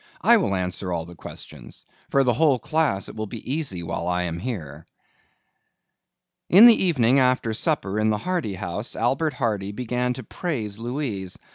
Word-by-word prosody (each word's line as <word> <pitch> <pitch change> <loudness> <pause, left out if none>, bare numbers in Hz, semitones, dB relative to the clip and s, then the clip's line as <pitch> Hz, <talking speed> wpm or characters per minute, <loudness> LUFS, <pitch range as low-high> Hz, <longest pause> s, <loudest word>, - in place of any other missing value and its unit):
I 235 0 +6
will 180 - 0
answer 90 0 -2
all 85 -2 -2
questions. 85 - -9 0.2
For 140 - +3
the 125 -2 +2
whole 140 +2 +3
class 145 - 0
it - - -10
will 110 0 -4
be 125 - -6
easy 135 - -2
while 85 - -4
I 90 0 0
am 85 -1 -4
here." 80 - -6 1.6
In 200 +6 +9
the 230 -5 +7
evening 135 -6 +3
after 125 -3 +2
supper 110 -6 0
in 110 0 +2
the 105 - +1
Hardy 170 - -2
house, 95 +5 -4
Albert 135 +7 0
Hardy 105 -6 -1
began 125 +2 -1
to 130 - -8
praise 110 - -4
Louise. 115 -7 -4
115 Hz, 165 wpm, -24 LUFS, 95-140 Hz, 1.6 s, In